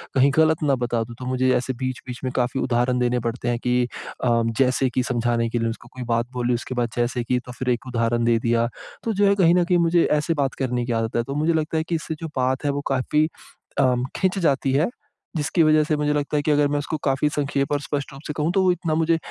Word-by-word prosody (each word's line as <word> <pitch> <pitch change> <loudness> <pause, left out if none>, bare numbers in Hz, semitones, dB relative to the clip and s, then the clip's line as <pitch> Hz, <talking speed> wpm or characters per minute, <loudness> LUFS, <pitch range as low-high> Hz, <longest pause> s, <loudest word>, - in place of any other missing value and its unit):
कहीं 135 +1 +5
गलत 160 -1 +3
ना 140 -2 +3
बता 120 -2 -1
दूँ। 115 +1 -10
तो 130 - -6
मुझे 130 0 +1
ऐसे 130 +1 -2
बीच-बीच 130 -1 -5
में 130 - -1
काफ़ी 125 +1 0
उदाहरण 125 +1 +1
देने 125 0 +1
पड़ते 120 +1 -3
हैं 120 -1 0
कि 125 0 +2 0.4
अ, 115 -2 +3 0.2
जैसे 130 0 +3
कि 125 0 0
समझाने 120 -1 0
के 120 - -1
लिए 115 - 0
उसको 120 +1 -8
कोई 130 -1 -6
बात 115 +1 0
बोली 125 0 0
उसके 120 +2 -4
बाद 120 -1 0
जैसे 120 0 0
कि 125 +1 0
तो 125 - -8
फिर 130 - -1
एक 125 +1 -1
उदाहरण 120 -1 0
दे 115 -1 +4
दिया। 115 0 +1 0.4
तो 225 - -1
जो 200 0 +3
है 200 - +4
कहीं 175 -3 +4
न 180 - +4
कहीं 180 0 +3
मुझे 170 0 +4 0.2
ऐसे 160 +3 0
बात 135 - -1
करने 125 -2 -1
की 120 - -3
आदत 115 0 -3
है। 120 - +2
तो 140 +3 -5
मुझे 155 +3 +2
लगता 160 0 -1
है 160 - +1
कि 170 - +1
इससे 160 0 -4
जो 165 - -3
बात 130 +3 0
है 145 - +2
वो 145 0 -2
काफ़ी 150 +4 +2 0.5
अम 125 -2 +2
खिंच 190 +1 +1
जाती 140 -5 +1
है। 150 +8 +2 0.5
जिसकी 155 +3 +2
वजह 155 0 +5
से 155 - +1
मुझे 150 0 +1
लगता 145 0 -1
है 145 - 0
कि 155 - +1
अगर 145 0 +4
मैं 145 0 0
उसको 150 +2 -3
काफ़ी 135 +2 +2
संक्षेप 140 -1 -1
और 145 - 0
स्पष्ट 145 -1 -4
रूप 135 - -11
से 150 - -3
कहूँ 155 +3 +1
तो 190 - +3
वो 185 - +4
इतना 165 -3 -1
मुझे 165 +1 +2
130 Hz, 265 wpm, -23 LUFS, 120-150 Hz, 0.5 s, कहीं